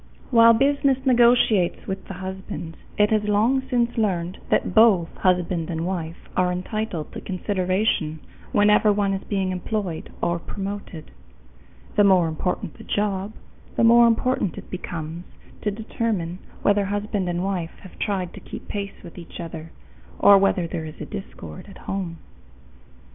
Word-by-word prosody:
While 230 -1 +8
business 275 +2 +3
negotiates 235 -7 +4
with 190 0 -5
the 195 - -6
husband, 185 -3 -6 0.2
it 210 +1 +4
has 215 -1 +2
long 220 +6 +3
since 240 -2 +1
learned 185 -3 -1
that - - +1
both 205 -6 +5
husband 180 -2 +1
and 165 -1 -2
wife 170 -3 -3 0.2
are 180 -1 +2
entitled 180 -2 -3
to - - -6
consideration 185 -4 0 0.3
whenever 210 +1 +5
one 200 -1 +1
is 195 - -3
being 195 -2 -1
employed 185 -2 -3
or 170 0 0
promoted. 195 -4 -6 0.9
The 205 - +7
more 185 -4 +5
important 170 +2 -3
the - - -9
job, 205 0 -1 0.4
the - - +2
more 235 +1 +7
important 230 -4 +1
it - - -10
becomes 170 -2 -5 0.4
to 210 - 0
determine 205 -4 -3 0.2
whether 205 0 +3
husband 205 -1 -2
and 175 +1 -1
wife 185 -4 -3
have 185 - -14
tried 190 -4 -2
to - - -9
keep - - -9
pace 200 -1 -5
with 175 0 -10
each 170 - -10
other, 165 -1 -7 0.5
or 200 -1 +7
whether 195 -2 +2
there 165 -1 -4
is 155 - -8 0.2
discord 195 -2 -8
at 195 - -12
home. 185 -4 -4
195 Hz, 150 wpm, -24 LUFS, 175-210 Hz, 0.9 s, While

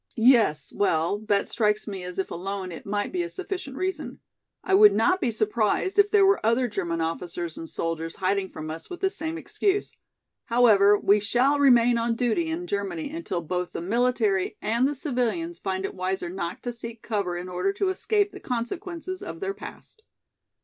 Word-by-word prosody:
"Yes, 230 - +4
well, 170 0 +1
that 200 -2 +2
strikes 210 -1 0
me 195 -3 -5
as 180 0 -7
if 190 - -2
alone 190 +1 -4
it 170 - -9
might 205 0 -1
be 360 - -1
a 345 - -3
sufficient 365 -8 -5
reason. 375 +2 -3 0.4
I 385 - -1
would 415 +2 +8
not 370 +1 +2
be 250 - +1
surprised 220 - 0
if 405 0 +6
there 410 -2 +5
were 390 +1 +3
other 235 +3 +2
German 170 -6 -2
officers 165 0 -3
and 165 - -7
soldiers 165 0 -3
hiding 190 0 0
from 155 0 -6
us 160 +1 -8
with 360 - -8
this 385 0 +1
same 320 +1 -4
excuse. 400 +3 -1 0.5
However, 210 -4 +5
we 205 +1 +4
shall 250 +8 +2
remain 245 -3 +5
on 230 0 0
duty 250 +8 0
in 335 +2 -3
Germany 280 - -3
until 315 - -3
both 180 +2 -3
the - - -4
military 220 -2 +1
and 235 +5 +1
the 290 - -2
civilians 290 +6 -2
find 190 -1 -2
it - - -4
wiser 185 -1 -2
not 170 -2 -5
to 245 - -3
seek 230 -1 -8
cover 200 -6 -2
in 180 +1 -6
order 180 - -1
to 395 -1 0
escape 410 +2 +1
the 390 - -10
consequences 350 - -4
of - - -7
their 395 0 -2
past." 440 - -11
230 Hz, 190 wpm, -26 LUFS, -, 0.5 s, would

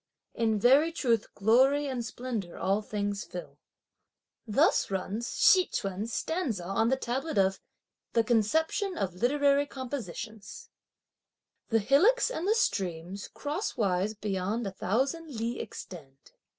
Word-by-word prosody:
in 220 -2 +1
very 275 +9 +5
truth 235 -9 +1
glory 260 +8 +4
and 260 -4 -3
splendour 230 -6 -5
all 195 +3 +1
things 205 -1 -3
fill! 180 - -9 0.9
Thus 295 - +3
runs 200 +4 -3
Hsi 370 -1 +5
Ch'un's 195 +4 -3
stanza 280 - -2
on 210 +5 +1
the 265 - +3
tablet 265 +2 -3
of 190 -1 +2 0.5
the 230 - +3
"Conception 320 - +1
of 185 -3 -2
literary 280 +7 +2
compositions": 230 -6 -7 1.0
The 225 - +3
hillocks 365 - +4
and 360 -6 -3
the 435 - +3
streams 185 - -2
crosswise 215 - -2
beyond 205 +2 -2
a 195 - -3
thousand 270 - -1
li 230 +2 -2
extend! 140 -10 -10
230 Hz, 125 wpm, -29 LUFS, 195-280 Hz, 1.0 s, very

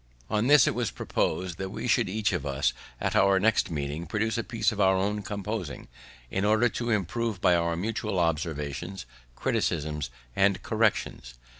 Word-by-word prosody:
On 105 +3 +2
this 145 -3 +7
it - - +1
was 120 -1 -1
propos'd 90 -2 -2
that 95 0 -3
we 105 - -5
should 105 - +2
each 105 -1 0
of 85 -7 -1
us, 70 -1 0 0.3
at - - -1
our 95 0 +5
next 110 +3 +2
meeting, 75 +1 -3
produce 110 +4 -1
a 115 - -1
piece 115 0 0
of 105 -2 -2
our 95 0 +5
own 105 +2 0
composing, 100 -4 -5 0.4
in 95 - -1
order 110 +3 +4
to 120 +1 -3
improve 110 +1 -1
by 90 -1 +4
our 85 0 +1
mutual 105 +2 -2
observations, 80 +1 -2 0.3
criticisms, 75 -3 -1 0.3
and 95 -1 +2
corrections. 105 - 0
95 Hz, 170 wpm, -27 LUFS, 85-110 Hz, 0.4 s, this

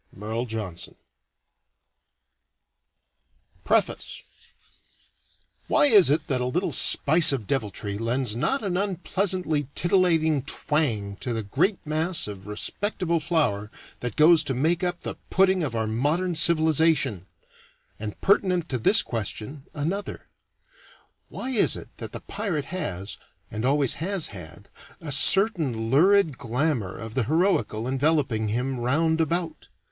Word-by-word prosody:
MERLE 110 +4 -5
JOHNSON. 105 -7 -6 2.7
PREFACE - - -1 1.4
Why - - +3
is 205 - +6
it 155 +2 +1
that 130 -4 -2
a - - -1
little 175 +9 -2
spice 155 +2 +6
of 130 -6 -3
deviltry 105 -4 -4
lends 115 0 -1
not 265 - -1
an 185 -3 -2
unpleasantly 185 -5 -2
titillating 165 -5 +2
twang 120 -8 -2
to 125 +1 -4
the 110 -1 -3
great 160 - 0
mass 160 +3 0
of 100 -1 -9
respectable 170 - -2
flour 150 - -1 0.3
that 120 -3 -5
goes 160 +1 +5
to 135 - -2
make 160 +7 0
up 175 -1 -2
the - - -6
pudding 190 0 +2
of 140 -7 -3
our 110 -1 -1
modern 150 +11 -1
civilization? 160 - +2 0.7
And 105 -1 -7
pertinent 185 -3 +1
to 130 - -2
this 205 - +5
question 115 +5 -5
another 170 +8 -5 1.0
Why 260 - -6
is 230 -6 +3
it - - -10
that - - -8
the - - -8
pirate 195 -8 -4
has, 100 - -5 0.3
and 110 - -5
always 140 0 +2
has 185 -1 +1
had, 90 0 -11 0.3
a 155 -3 -5
certain 145 - +4
lurid 165 0 +3
glamour 120 - -2
of 110 -1 -8
the 125 -2 -1
heroical 145 - 0
enveloping 130 -5 0
him 125 +4 -3
round 160 +7 0
about? 165 0 -3
150 Hz, 130 wpm, -24 LUFS, 115-175 Hz, 2.7 s, is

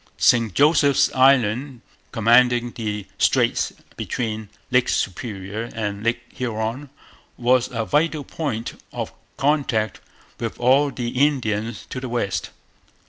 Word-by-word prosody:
St 115 -3 +4
Joseph's 145 - +4
Island, 130 -1 +3 0.3
commanding 120 +1 +4
the 105 -4 -4
straits - - +2 0.3
between 110 -3 -3 0.2
Lake 125 0 +3
Superior 105 +2 -3
and 105 -2 -3
Lake 115 +1 0
Huron, 120 +3 -3 0.5
was 125 0 +2
a 115 -2 -2
vital 150 +3 +1
point 125 -6 -4
of - - -5 0.2
contact 135 -7 0 0.4
with 115 -2 -4
all 135 +4 +4
the 120 -3 -4
Indians 120 -5 0
to 130 - -3
the 130 -1 -5
west. 100 -6 -2
120 Hz, 115 wpm, -22 LUFS, 110-130 Hz, 0.5 s, St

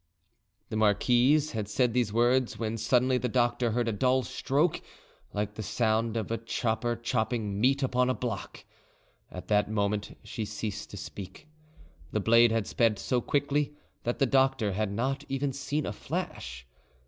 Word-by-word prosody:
The - - -4
marquise 125 +8 +3
had 110 -3 -3
said 120 +2 +1
these 120 -4 +1
words 120 +2 +2
when 110 -1 -2
suddenly 125 +3 +3
the 125 - -1
doctor 120 0 +1
heard 120 +1 0
a - - +1
dull 130 +5 +2
stroke 150 +7 0 0.5
like 105 0 -2
the 110 - -6
sound 110 +2 0
of 110 -1 -3
a 115 - -1
chopper 115 +1 -1
chopping 110 -3 -1
meat 135 +3 +3
upon 125 -1 +2
a 130 - +1
block: 115 -2 -5 0.6
at 90 - -9
that 105 -1 +3
moment 105 -1 -1
she 110 - -5
ceased 105 -1 -5
to 100 - -8
speak. 95 +8 -9 0.7
The 110 - +1
blade 115 +2 +5
had 115 -2 +1
sped 115 -4 +2
so 125 +4 0
quickly 145 +2 0 0.3
that 120 - -2
the 135 - +3
doctor 130 -5 +2
had 105 +1 -1
not 135 +6 -1
even 135 0 -1
seen 140 +2 -2
a 100 - -3
flash. 65 -10 -5
115 Hz, 165 wpm, -29 LUFS, 105-130 Hz, 0.7 s, blade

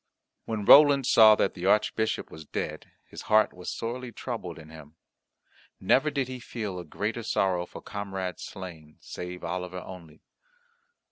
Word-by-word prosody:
When 110 -3 -3
Roland 140 0 +8
saw 110 -3 +7
that 100 - 0
the 90 0 -4
Archbishop 110 +2 +1
was 80 - -10
dead, - - -5 0.2
his - - -10
heart 110 0 +4
was 90 0 -7
sorely 120 +2 -5
troubled 115 -9 -6
in 80 -1 -13
him. 80 -1 -13 0.8
Never 135 +10 +3
did 140 -3 -2
he 130 -1 -7
feel 105 -6 -5
a - - -6
greater 105 +8 -4
sorrow 95 -5 0
for - - -11
comrade 95 -3 -5
slain, 85 -6 -9
save 90 0 -8
Oliver 90 0 -4
only. 85 -5 -12
95 Hz, 150 wpm, -27 LUFS, 90-115 Hz, 0.8 s, Roland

